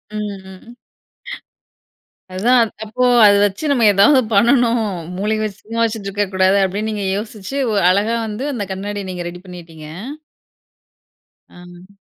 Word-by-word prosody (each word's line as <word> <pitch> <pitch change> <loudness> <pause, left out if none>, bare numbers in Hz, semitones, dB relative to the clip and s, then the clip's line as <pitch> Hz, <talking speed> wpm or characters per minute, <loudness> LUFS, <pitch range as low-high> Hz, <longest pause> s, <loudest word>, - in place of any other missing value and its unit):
ம், 210 -1 -4
ம். 190 +3 -15 1.7
அதான் 230 +4 +3
அப்போ, 220 +4 -1 0.2
அத 205 - +7
வச்சு 205 +9 -3
நம்ம 245 -5 +2
எதாவது 205 +8 +5
பண்ணணும். 235 +2 +3 0.4
மூளைய 215 +2 -1
வச்சு, 210 -2 -5
சும்மா 230 +2 -3
வச்சிட்ருக்கக்கூடாது 200 -3 0
அப்படின்னு 200 +3 -2
நீங்க 205 -2 -4
யோசிச்சு, 215 +3 -6
வ் 205 - +1
அழகா 205 +5 +1
வந்து 215 +5 -5
அந்த 225 -5 -3
கண்ணாடிய 200 +2 -5
நீங்க 180 -1 -5
ரெடி 180 +1 -10
பண்ணிட்டீங்க! 165 -4 -11 1.7
ஆஹ். 175 +1 -15
205 Hz, 125 wpm, -18 LUFS, 190-225 Hz, 1.7 s, அத